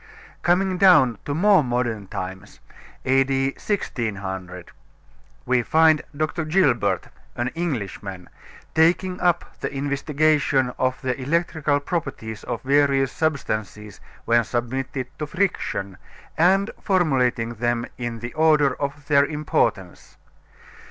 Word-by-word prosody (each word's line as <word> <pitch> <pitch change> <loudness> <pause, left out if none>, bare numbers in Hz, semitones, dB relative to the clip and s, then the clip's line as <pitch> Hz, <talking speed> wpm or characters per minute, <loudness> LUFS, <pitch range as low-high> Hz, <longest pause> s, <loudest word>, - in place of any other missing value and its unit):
Coming 185 +1 +1
down 135 - +5
to 145 - -2
more 195 0 +5
modern 120 -5 -2
times 95 0 -7 0.5
A.D. 135 0 +2
1600 95 - -4 0.7
we 125 0 +2
find 160 +4 +4 0.2
Dr. 155 +2 -1
Gilbert, 155 - +1 0.3
an 120 +1 -1
Englishman, 100 - -5 0.5
taking 180 +3 +2
up 175 -1 0
the - - -3
investigation 140 -1 +1
of 130 0 0
the 130 -1 0
electrical 155 0 0
properties 135 - -4
of - - -4
various 135 -1 +3
substances 110 -9 -3 0.3
when 115 0 +3
submitted 130 +3 -3
to 150 - -3
friction, 150 - -2 0.4
and 195 +5 +3
formulating 130 - +1
them 120 +1 -1
in 120 -2 -4
the 120 0 -6
order 155 -3 +3
of 140 +1 -4
their 140 -1 +4
importance. 150 0 -2
135 Hz, 110 wpm, -23 LUFS, 120-160 Hz, 0.7 s, down